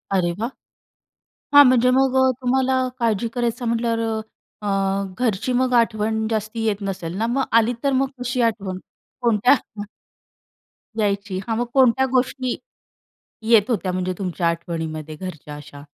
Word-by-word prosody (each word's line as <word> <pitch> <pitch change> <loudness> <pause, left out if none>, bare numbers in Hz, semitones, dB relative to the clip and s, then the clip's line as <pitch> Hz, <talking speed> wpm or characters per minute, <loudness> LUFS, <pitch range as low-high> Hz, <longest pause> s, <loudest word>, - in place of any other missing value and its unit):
अरे 175 -2 +1
वाह! 230 +3 -1 1.0
हां. 285 0 +10
म्हणजे 250 0 +4
मग 265 0 +3
अ, 260 0 +5
तुम्हाला 260 +1 +1 0.2
काळजी 230 -1 +1
करायचं 240 0 -2
म्हटल्यावर 230 0 0
अ, 220 -1 -6
अ, - - 0 0.5
घरची 240 +1 0
मग 255 -1 0
आठवण 220 -2 +1
जास्ती 220 +1 -2
येत 210 -2 0
नसेल 175 -3 -5
ना, 225 +2 0
मग 265 +3 0 0.2
आली 230 +2 +1
तर 280 - +2
मग 270 - 0
कशी 250 0 -1
आठवण? 195 -4 -6 0.4
कोणत्या 235 +1 +4
हं. 215 -5 -4 1.1
यायची. 200 -2 -1
हां, 225 - 0
मग 240 - 0
कोणत्या 265 0 +4
गोष्टी, 255 0 0 0.9
येत 220 0 +4
होत्या 185 -5 -1
म्हणजे 185 0 -2
तुमच्या 180 -2 -1
आठवणीमध्ये 160 -2 -4
घरच्या 155 -5 -8
अशा? 145 -1 -12
225 Hz, 145 wpm, -22 LUFS, 190-245 Hz, 1.1 s, हां